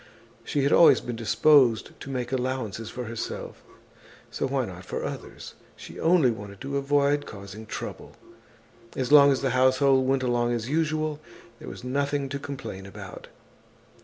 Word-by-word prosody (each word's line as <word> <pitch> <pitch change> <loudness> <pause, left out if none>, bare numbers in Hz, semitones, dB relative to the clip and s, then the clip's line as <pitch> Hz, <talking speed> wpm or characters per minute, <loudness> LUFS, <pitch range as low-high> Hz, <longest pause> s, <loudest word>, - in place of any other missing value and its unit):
She 145 - -1
had 140 - +2
always 170 - +7
been 120 - -6
disposed 120 +1 +3
to - - -9
make 125 -2 -3
allowances 125 -5 -3
for 125 +2 -6
herself, 115 -1 -6 0.7
so - - -2
why 135 -1 -1
not 90 -3 -9
for - - -5
others? - - -8 0.2
She - - -11
only 165 -7 +4
wanted 100 -2 -9
to 140 +1 -3
avoid 145 +1 +1
causing 100 +1 -10
trouble. - - -7 0.8
As 130 0 -2
long 140 -1 +8
as 135 - 0
the 135 -2 0
household 130 +1 +3
went 135 0 +1
along 120 -1 +1
as 115 -1 -3
usual, 155 0 -1 0.4
there - - -8
was - - -10
nothing 140 +2 -1
to 140 +1 -4
complain 130 -9 -7
about. 100 - -10
130 Hz, 160 wpm, -26 LUFS, 115-140 Hz, 0.8 s, long